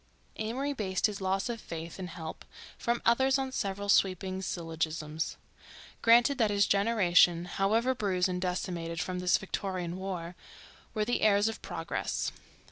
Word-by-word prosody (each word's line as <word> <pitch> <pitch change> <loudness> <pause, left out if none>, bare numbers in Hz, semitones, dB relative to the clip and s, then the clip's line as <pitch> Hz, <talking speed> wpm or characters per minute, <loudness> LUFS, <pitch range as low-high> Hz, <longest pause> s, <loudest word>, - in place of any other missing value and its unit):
Amory 255 +7 -2
based 190 -7 -1
his 210 -2 -1
loss 190 0 0
of 235 -2 -4
faith 165 +1 -7
in 185 - -4
help 165 -2 -7 0.3
from 235 0 -1
others 265 +3 +4
on 265 -1 -2
several 200 -4 -3
sweeping 190 -1 +2
syllogisms. 160 -3 -3 0.6
Granted 240 +4 +5
that 220 -3 +4
his 200 -1 +3
generation, 185 -5 +4
however 220 +8 +1
bruised 195 -7 +1
and 180 -1 -3
decimated 175 -2 -3
from 180 +1 -2
this 180 0 +3
Victorian 185 -3 -4
war, 180 -2 -5 0.6
were 215 -1 +1
the 245 - 0
heirs 205 0 +4
of 225 - -4
progress. - - -3
195 Hz, 145 wpm, -30 LUFS, 175-220 Hz, 0.6 s, Granted